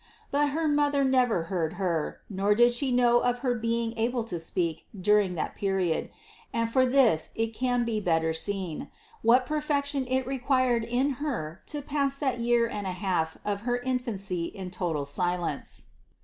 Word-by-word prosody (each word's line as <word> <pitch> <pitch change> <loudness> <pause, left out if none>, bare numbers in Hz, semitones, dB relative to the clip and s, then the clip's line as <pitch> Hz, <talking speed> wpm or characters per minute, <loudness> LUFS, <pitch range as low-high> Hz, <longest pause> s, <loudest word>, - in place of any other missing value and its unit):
But 290 +1 +2
her 315 +3 0
mother 290 -1 +2
never 250 -9 +3
heard 165 -2 -2
Her, 175 -4 -2
nor 200 +1 +1
<iid 240 +2 +5
she 265 +1 0
know 240 -1 +4
of 245 0 +1
her 250 - +3
being 230 0 -1
able 240 +1 0
to 180 -7 -4
speak 165 -1 -1
during 200 -1 +3
that 160 - -3
period; 190 -5 0 0.4
and 230 0 0
from 255 +2 +2
this 235 - +4
it 225 0 -1
can 245 0 0
be 225 -2 -1
better 160 -4 +1
seen, 185 -1 -3 0.3
what 245 +3 +5
perfec 295 0 0
tion 280 -2 -2
it 260 0 0
required 255 -2 +1
in 250 +4 0
Her 190 - -3
to 295 -1 -4
pass 280 -1 0
that 265 -4 -1
year 235 0 +3
and 205 -3 -4
a 185 - -2
half 175 -5 -1
of 205 -1 -1
her 245 +1 0
infancy 230 -9 -2
in 185 +1 -7
total 165 -6 -2
silence. 175 0 -2
230 Hz, 175 wpm, -28 LUFS, 185-255 Hz, 0.4 s, <iid